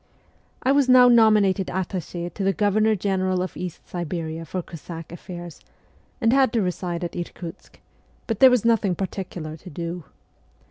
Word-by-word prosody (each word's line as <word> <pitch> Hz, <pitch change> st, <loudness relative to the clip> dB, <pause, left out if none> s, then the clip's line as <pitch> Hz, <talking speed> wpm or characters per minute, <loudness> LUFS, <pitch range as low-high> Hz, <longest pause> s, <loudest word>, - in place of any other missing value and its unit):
I 260 Hz, -, +3 dB
was 280 Hz, -2 st, +3 dB
now 250 Hz, -1 st, +8 dB
nominated 215 Hz, -5 st, +4 dB
attache 175 Hz, -2 st, -4 dB
to 200 Hz, -, -5 dB
the 195 Hz, 0 st, +2 dB
Governor 215 Hz, +1 st, +2 dB
'j 190 Hz, -, -10 dB
General 185 Hz, -1 st, +1 dB
of 185 Hz, -, -6 dB
East 180 Hz, -2 st, -7 dB
Siberia 165 Hz, -1 st, -4 dB
for 180 Hz, +2 st, -4 dB
Cossack 165 Hz, 0 st, -9 dB
affairs, 175 Hz, -1 st, -9 dB, 0.6 s
and 230 Hz, -2 st, +3 dB
had 265 Hz, -3 st, +4 dB
to 230 Hz, -, +2 dB
reside 180 Hz, -1 st, -3 dB
at 175 Hz, -, -4 dB
Irkutsk; 170 Hz, -1 st, -8 dB, 0.5 s
but 225 Hz, -3 st, -3 dB
there 265 Hz, -, +9 dB
was 250 Hz, -3 st, +2 dB
nothing 210 Hz, -5 st, +2 dB
particular 175 Hz, -4 st, -5 dB
to 180 Hz, -, -12 dB
do. 170 Hz, +1 st, -5 dB
185 Hz, 160 wpm, -24 LUFS, 175-215 Hz, 0.6 s, there